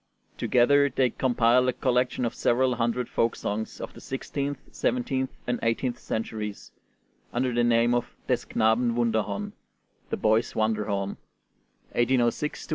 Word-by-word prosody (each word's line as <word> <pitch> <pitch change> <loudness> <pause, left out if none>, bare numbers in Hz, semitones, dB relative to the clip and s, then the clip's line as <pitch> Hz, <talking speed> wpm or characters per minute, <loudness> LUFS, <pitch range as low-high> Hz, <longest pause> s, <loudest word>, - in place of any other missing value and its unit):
Together 140 +3 +4
they 130 -2 +1
compiled 125 0 +3
a - - 0
collection 125 0 +1
of 115 - -2
several 125 +1 +2
hundred 120 +1 0
folk 115 - 0
songs 110 +2 -4
of - - -6
the - - -12
sixteenth, 140 +1 -3
seventeenth, 130 +2 -1 0.2
and 120 0 -1
eighteenth 115 +2 0
centuries, 110 -2 -4 0.6
under 125 +1 0
the 120 0 +2
name 120 0 +3
of 120 -1 -1
'Des - - 0
Knaben 115 +2 +2
Wunderhorn' 110 -4 -1 0.6
(The - - -2
Boy's 110 +2 +2
Wonderhorn), 105 -3 -1 0.7
1806 120 +4 +1
1808. - - -26
120 Hz, 135 wpm, -27 LUFS, 110-125 Hz, 0.7 s, Together